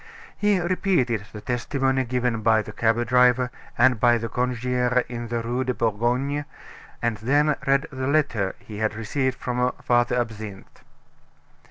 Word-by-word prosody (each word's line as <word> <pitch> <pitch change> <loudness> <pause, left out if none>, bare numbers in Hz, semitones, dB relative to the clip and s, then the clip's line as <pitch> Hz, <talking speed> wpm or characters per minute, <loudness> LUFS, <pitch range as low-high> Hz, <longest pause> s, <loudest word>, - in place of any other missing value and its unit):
He 205 -2 +2
repeated 170 - 0
the 105 - -9
testimony 130 +3 0
given 125 -2 -1
by 110 0 +3
the - - -8
cab 115 +1 +1
driver, 125 0 +3 0.3
and 125 -1 +4
by 120 0 +4
the 115 0 -4
concierge 125 +1 0
in 120 -1 -5
the 115 0 -2
Rue 120 +3 -1
de 125 -1 -2
Bourgogne, 125 +6 0 0.6
and 115 -2 0
then 145 +7 +2
read 140 +2 +3
the 130 -1 -3
letter 140 -10 +1
he 105 -1 -10
had 110 -1 0
received 130 +4 -1
from 125 0 0
Father 120 0 +2
Absinthe. 110 -4 -6
125 Hz, 150 wpm, -24 LUFS, 115-130 Hz, 0.6 s, and